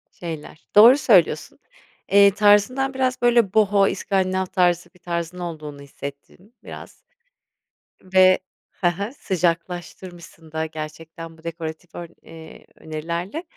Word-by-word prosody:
Şeyler 160 -1 -9
Doğru 240 +6 +8
söylüyorsun. 190 - +2 0.5
Eee, 200 0 +7
tarzından 215 +6 +3
biraz, 255 -2 -1
böyle, 235 -5 +3
Boho 205 -2 +4
iskandinav 190 -1 -1
tarzı 175 -1 0
bir 180 - -21
tarzın 170 0 -5
olduğunu 155 -5 -7
hissettin 140 - -11
biraz - - -12 1.0
ve 185 0 +4 0.3
he 175 - 0
he, 200 +7 -6
sıcaklaştırmışsın 175 - -4
da 160 0 -2
gerçekten 160 +1 -9
bu 160 - -21
dekoratif 165 0 -7
ör 170 -1 -7
eee, 160 -1 -14
önerilerle. 170 - -5
175 Hz, 115 wpm, -22 LUFS, 165-200 Hz, 1.0 s, Doğru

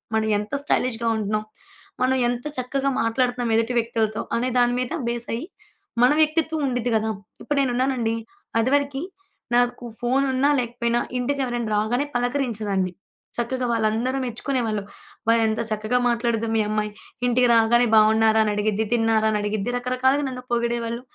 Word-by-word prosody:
మనం 220 0 +1
ఎంత 210 +5 -5
స్టైలిష్‌గా 235 -5 0
ఉంటున్నాం, 215 0 -1 0.6
మనం 255 +1 +3
ఎంత 245 +2 -3
చక్కగా 270 +2 -1
మాట్లాడుతున్నాం 245 +1 0
ఎదుటి 230 +2 +1
వ్యక్తులతో 225 -1 0
అనే 245 +2 0
దాని 245 0 +4
మీద 250 - -4 0.2
బేసై 235 -1 -2 0.6
మన 250 +3 +6
వ్యక్తిత్వం 315 0 +2
ఉండిద్ది 245 -1 -1
గదా! 220 0 +1 0.3
ఇప్పుడు 290 - -2
నేనున్నానండి, 250 -3 +1 0.4
అది 230 +3 +2
వరకి 280 -1 +1 0.5
నాకు 245 0 +1 0.2
ఫోనున్నా 265 +2 +2
లేకపోయినా 240 0 -1 0.2
ఇంటికి 275 +3 -1
ఎవరైనా 240 -2 -2
రాగానే 235 +7 +1
పలకరించేదాన్ని. 225 -7 -1 0.5
చక్కగా 250 +2 -1
వాళ్ళందరూ 230 +4 0
మెచ్చుకునేవాళ్ళు, 235 -3 -2 0.4
"అబ్బా! 230 - +3
ఎంత 220 0 -1
చక్కగా 215 +3 0
మాట్లాడిద్దో 230 -1 0
మీ 220 - +3
అమ్మాయి. 215 0 -1 0.4
ఇంటికి 245 0 +3
రాగానే 235 +2 +4
బావున్నారా? 220 +1 +5
అని 210 - 0
అడిగిద్ది, 215 +1 0
తిన్నారా? 225 -1 +2
అని 210 - 0
అడిగిద్ది" 210 +2 -2
రకరకాలుగా 255 +3 +1
నన్ను 250 -1 -7
పొగిడేవాళ్ళు. 235 0 -1
240 Hz, 140 wpm, -23 LUFS, 220-255 Hz, 0.6 s, మన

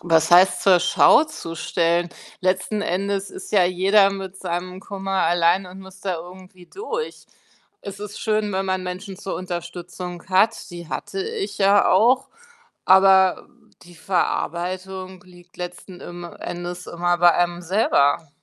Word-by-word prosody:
was 165 -1 +2
heißt, 180 +1 +5
zur 185 -2 +5
Schau 180 - +5
zu 170 - -8
stellen? 170 +2 0 0.3
Letzten 185 +3 0
Endes 195 +2 -2
ist - - -10
ja 195 -4 +5
jeder 195 +3 +3
mit 195 -1 -7
seinem 180 0 -5
Kummer 195 -1 -3
alleine 175 +2 +2
und 190 - -11
muss 190 0 -14
da 190 -2 -2
irgendwie 180 +1 -13
durch. 460 - -6 0.5
Es 200 0 -9
ist 210 -1 -8
schön, 215 -2 0
wenn 190 +1 -1
man 185 0 -1
Menschen 185 +2 -6
zur 190 - -5
Unterstützung 175 0 -7
hat. 205 +2 +1
Die 170 -2 -9
hatte 160 - -5
ich 440 -1 -5
ja 200 0 +4
auch, 255 +4 +3 0.6
aber 190 0 +5 0.3
die 175 0 -16
Verarbeitung 185 +1 -3
liegt 175 -1 -19
letzten 180 +1 -8
im 175 0 -9
Endes 175 +1 -7
immer 175 0 -1
bei 175 -1 +5
einem 175 0 0
selber. 165 -5 +2
185 Hz, 145 wpm, -22 LUFS, 175-195 Hz, 0.6 s, heißt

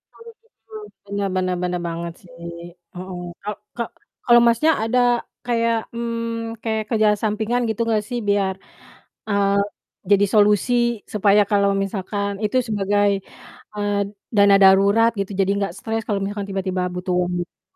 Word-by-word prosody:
Oh - - -18 0.3
begitu. 225 0 -36 0.4
Bener 200 0 -2
bener, 185 -1 0
bener 180 0 -1
banget 170 0 -4
sih. 170 - -18 0.6
Heeh, 180 0 -7 0.2
ka 210 - -4 0.3
ka 235 - 0 0.4
kalau 240 -1 +7
Masnya 270 +8 +4
ada 245 +3 +1 0.5
kayak, 230 -1 +1 0.2
mmm, 230 -1 -3
kayak 220 -1 -1
kerjaan 215 -3 +2
sampingan 220 +3 0
gitu 220 +1 -2
gak 215 - +3
sih 245 -1 -2
biar, 195 -2 +1 0.7
eee, 200 -1 +2 0.5
jadi 200 0 +5
solusi 210 +3 +4 0.4
supaya 205 0 +4
kalau 200 -1 +3
misalkan 200 +1 -3
itu 210 +5 0
sebagai, 205 -1 +1 0.7
eee, 205 -1 -1 0.4
dana 200 -1 +6
darurat 200 +4 +5
gitu 195 +1 -2
jadi 195 - +2
nggak 200 -4 -2
stres 225 0 -3
kalau 200 -2 0
misalkan 200 0 -4
tiba-tiba 190 -1 -2
butuh 180 0 -3
uang 180 0 -1
gitu? 175 - -14
205 Hz, 145 wpm, -21 LUFS, 195-225 Hz, 0.7 s, kalau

